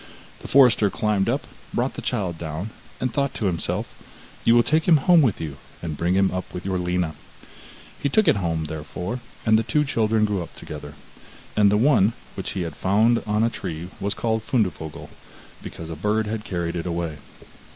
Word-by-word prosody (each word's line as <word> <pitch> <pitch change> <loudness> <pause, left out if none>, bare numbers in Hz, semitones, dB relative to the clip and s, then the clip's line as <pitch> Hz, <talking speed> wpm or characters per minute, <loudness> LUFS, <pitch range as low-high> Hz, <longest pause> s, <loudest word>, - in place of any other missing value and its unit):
The - - -9
forester 125 -6 +6
climbed 105 0 +1
up, - - 0 0.3
brought - - 0
the - - -6
child 90 -5 -2
down, 85 +6 -4 0.3
and 130 -2 -1
thought 140 -1 0
to 110 - -2
himself: 85 -4 -1 0.6
'You 115 - +5
will 120 - +6
take 155 +4 +2
him 165 -3 +7
home 170 +4 +5
with 120 -9 +2
you, 75 -4 -5 0.3
and 80 -3 -3
bring 85 +4 +1
him 95 0 +3
up 95 0 -4
with 90 - -6
your 95 -2 0
Lina.' 90 -2 0 0.9
He 140 - +1
took 215 +8 +3
it - - +5
home, 80 -4 -1
therefore, 80 - -5 0.3
and 110 -1 +5
the - - +2
two 150 +7 +1
children 110 -4 +2
grew 105 -3 -1
up 85 - -9
together. 75 -1 -8 0.6
And 105 -1 +5
the 105 - +4
one, 115 -3 +4 0.2
which - - -4
he 95 - -2
had 80 -3 -5
found 110 +5 +3
on 105 +1 +2
a 115 - +2
tree 85 -4 -5
was 100 +1 -1
called 110 -1 0
Fundevogel, 95 - -2 0.5
because 80 0 -8
a - - -4
bird 105 +6 0
had 110 0 -3
carried 85 -4 -2
it 85 0 -3
away. 85 -3 -3
100 Hz, 195 wpm, -24 LUFS, 85-115 Hz, 0.9 s, him